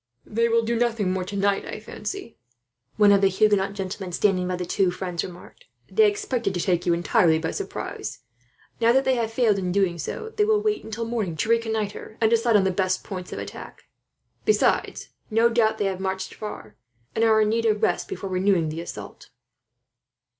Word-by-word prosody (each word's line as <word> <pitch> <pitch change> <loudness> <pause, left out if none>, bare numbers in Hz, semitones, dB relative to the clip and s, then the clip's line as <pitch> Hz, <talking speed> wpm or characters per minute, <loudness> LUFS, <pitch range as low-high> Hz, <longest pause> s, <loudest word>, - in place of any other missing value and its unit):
"They 230 +2 +1
will 230 0 +3
do 235 +1 0
nothing 230 -5 +1
more 185 0 -1
tonight, 200 +1 0
I - - -6
fancy," 390 - -7 0.6
one 210 -1 +6
of 200 -1 +5
the 195 - +5
Huguenot 200 0 +2
gentlemen 190 -1 -5
standing 185 0 +1
by 180 - -1
the 180 0 -4
two 185 +1 +1
friends 180 -1 -3
remarked. 180 - -11 0.3
"They 435 -1 +5
expected 250 - -2
to - - -1
take 175 0 0
you 170 - +4
entirely 170 -1 +3
by 160 0 -2
surprise. 400 - -5 0.6
Now 230 0 +4
that 265 +1 +3
they 265 - +3
have 230 -3 -1
failed 225 -4 +2
in 180 -1 -2
doing 180 -3 +1
so, 440 - -5
they 425 - +3
will 425 0 +3
wait 425 0 -1
until 225 +1 -4
morning 215 -8 -2
to 215 - -1
reconnoitre, 220 -2 -1
and 220 -1 +3
decide 230 0 +3
on 205 - +5
the 190 - +2
best 185 0 0
points 185 -3 -7
of - - -5
attack. - - -8 0.6
Besides, 430 - +1 0.2
no 225 +1 +4
doubt 230 -2 +2
they 205 - 0
have 190 -1 -2
marched 190 0 -3
far, 160 - -8 0.4
and 225 - +1
are 220 -1 +5
in 215 -1 +3
need 230 +1 +1
of 215 -1 +1
rest - - +1
before 195 - -5
renewing 185 -3 +2
the 160 +2 -4
assault." 170 - -9
205 Hz, 195 wpm, -24 LUFS, 185-230 Hz, 0.6 s, one